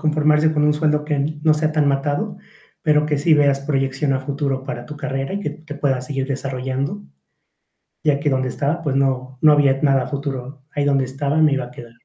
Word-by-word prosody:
conformarse 155 0 +3
con 150 -1 +2
un 150 - +4
sueldo 150 0 +1
que 150 -1 -1 0.3
no 155 -1 +5
sea 155 0 0
tan 155 -2 +1
matado, 140 +1 -1 0.4
pero 150 -1 +3
que 150 -2 0
sí 155 +2 +4
veas 140 -2 +3
proyección 135 0 0
a 135 - +1
futuro 135 -1 -2
para 120 -1 -5
tu 150 - -9
carrera 135 -1 -3
y - - -1
que - - -3
te 155 -2 -10
puedas 135 -3 0
seguir 135 -2 -2
desarrollando, 130 - -3 1.0
ya 145 -2 +2
que 145 - +1
donde 130 -1 0
estaba, 145 +6 -2
pues 145 -4 -1
no 130 -1 0
no 155 - +7
había 140 -2 +3
nada 135 -3 +3
a - - -7
futuro 140 -1 -5
ahí 145 -1 -1
donde 135 -2 +2
estaba, 140 +3 -1
me 155 -3 +4
iba 135 - -2
a 125 - -11
quedar. 120 -1 -11
140 Hz, 215 wpm, -20 LUFS, 135-150 Hz, 1.0 s, no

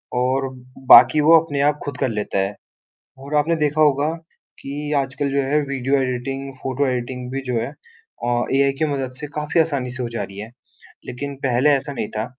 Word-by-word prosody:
और 130 +2 +1 0.4
बाकी 155 - +9
वो 165 +2 +7
अपने 150 -3 -3
आप 145 +1 +2
खुद 140 -3 -5
कर 135 - 0
लेता 105 -3 -2
है। 95 +2 -1 0.6
और 140 +3 -7
आपने 160 +3 +2
देखा 150 0 0
होगा, 150 +1 +3 0.5
कि 145 +2 -5
आजकल 140 0 -1
जो 140 0 +1
है 145 +3 +1
वीडियो 135 0 0
एडिटिंग 135 +2 -3
फ़ोटो 135 +2 0
एडिटिंग 125 0 -3
भी 135 +1 -3
जो 125 - -2
है 115 - -3 0.6
अ, 120 0 +1
एआई 140 0 +3
की 155 - +1
मदद 135 -3 -3
से 150 - -4
काफ़ी 150 +2 0
आसानी 140 -6 -1
से 125 +1 -5
हो 120 - -2
जा 115 - -4
रही 100 -1 -8
है, 110 +2 -7 0.6
लेकिन 140 +3 -5
पहले 130 +3 +3
ऐसा 140 0 0
नहीं 115 -6 -4
था। 110 - -1
135 Hz, 200 wpm, -21 LUFS, 125-145 Hz, 0.6 s, बाकी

